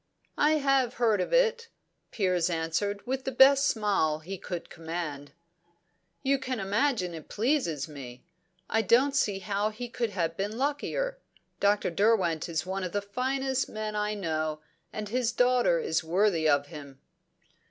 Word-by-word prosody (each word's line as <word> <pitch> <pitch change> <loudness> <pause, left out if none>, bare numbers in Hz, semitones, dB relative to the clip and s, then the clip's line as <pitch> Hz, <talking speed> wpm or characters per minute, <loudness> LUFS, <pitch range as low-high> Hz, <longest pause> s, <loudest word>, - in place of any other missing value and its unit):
"I 300 +1 +4
have 275 -4 +2
heard 220 -5 +2
of - - -3
it," 480 -2 +2 0.4
Piers 180 -5 +1
answered, 170 +5 -2
with 265 +1 -2
the 265 - -2
best 275 +2 +6
smile 200 -8 +1
he 170 +5 -7
could 175 -2 -6
command. 160 -4 -6 0.9
"You 275 0 +2
can 255 -2 -3
imagine 200 -1 0
it 160 -2 -9
pleases 215 - 0
me. 130 -5 -10 0.4
I 225 - +2
don't 255 +7 +3
see 205 -8 +1
how 200 +2 -1
he 235 +3 -7
could 235 -1 -2
have 170 -4 -2
been 205 +4 -3
luckier. 400 - -2 0.4
Dr. 205 -2 +2
Derwent 185 -5 +2
is 160 0 -2
one 190 +1 -3
of 180 - -4
the 205 - 0
finest 265 +5 -1
men 215 0 -4
I 210 0 -1
know, 155 -5 -2 0.3
and 215 -1 -5
his 240 +2 0
daughter 250 - +3
is 455 - -1
worthy 170 -1 +2
of 145 -1 +3
him." 145 -3 -11
210 Hz, 155 wpm, -28 LUFS, 170-255 Hz, 0.9 s, best